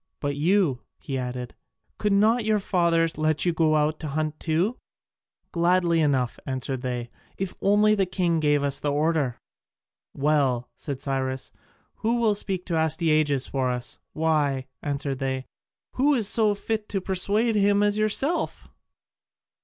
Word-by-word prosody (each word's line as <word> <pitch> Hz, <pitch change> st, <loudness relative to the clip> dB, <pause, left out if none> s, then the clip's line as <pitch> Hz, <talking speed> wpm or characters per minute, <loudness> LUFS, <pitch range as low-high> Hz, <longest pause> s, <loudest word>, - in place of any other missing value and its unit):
But 145 Hz, -1 st, -2 dB
you," 160 Hz, -4 st, +2 dB, 0.2 s
he 135 Hz, -, -6 dB
added, 125 Hz, -1 st, -4 dB, 0.5 s
"could 210 Hz, -, +1 dB
not 220 Hz, +4 st, +3 dB
your 215 Hz, -1 st, +2 dB
fathers 165 Hz, -4 st, +1 dB
let 155 Hz, 0 st, +1 dB
you 175 Hz, -, +2 dB
go 160 Hz, -1 st, +2 dB
out 155 Hz, +1 st, +1 dB
to 155 Hz, -, -5 dB
hunt 155 Hz, +1 st, -2 dB
too?" 170 Hz, +9 st, 0 dB, 0.7 s
"Gladly 170 Hz, 0 st, +2 dB
enough," 130 Hz, -5 st, 0 dB
answered 130 Hz, -1 st, -3 dB
they, 125 Hz, -2 st, -4 dB, 0.3 s
"if 195 Hz, -1 st, -3 dB
only 210 Hz, +2 st, +4 dB
the 195 Hz, -3 st, +1 dB
king 175 Hz, -3 st, 0 dB
gave 145 Hz, -2 st, +2 dB, 0.2 s
the 145 Hz, -, 0 dB
order." 150 Hz, -4 st, 0 dB, 0.8 s
"Well," 140 Hz, -4 st, +1 dB
said 140 Hz, -2 st, -6 dB
Cyrus, 130 Hz, -1 st, -2 dB, 0.5 s
"who 235 Hz, +2 st, 0 dB
will 225 Hz, -3 st, +3 dB
speak 190 Hz, -3 st, -2 dB
to 170 Hz, -3 st, -1 dB
Astyages 155 Hz, -3 st, +2 dB
for 130 Hz, -2 st, -1 dB
us?" 125 Hz, -1 st, -3 dB
"Why," 150 Hz, -4 st, +1 dB, 0.2 s
answered 140 Hz, -2 st, -2 dB
they, 130 Hz, -1 st, -2 dB, 0.5 s
"who 275 Hz, 0 st, +3 dB
so 210 Hz, 0 st, +3 dB
fit 215 Hz, +1 st, -3 dB
to 195 Hz, -, -1 dB
persuade 200 Hz, +5 st, +1 dB
him 205 Hz, 0 st, +3 dB
as 205 Hz, 0 st, +2 dB
yourself?" 275 Hz, +10 st, 0 dB
160 Hz, 145 wpm, -25 LUFS, 140-200 Hz, 0.8 s, only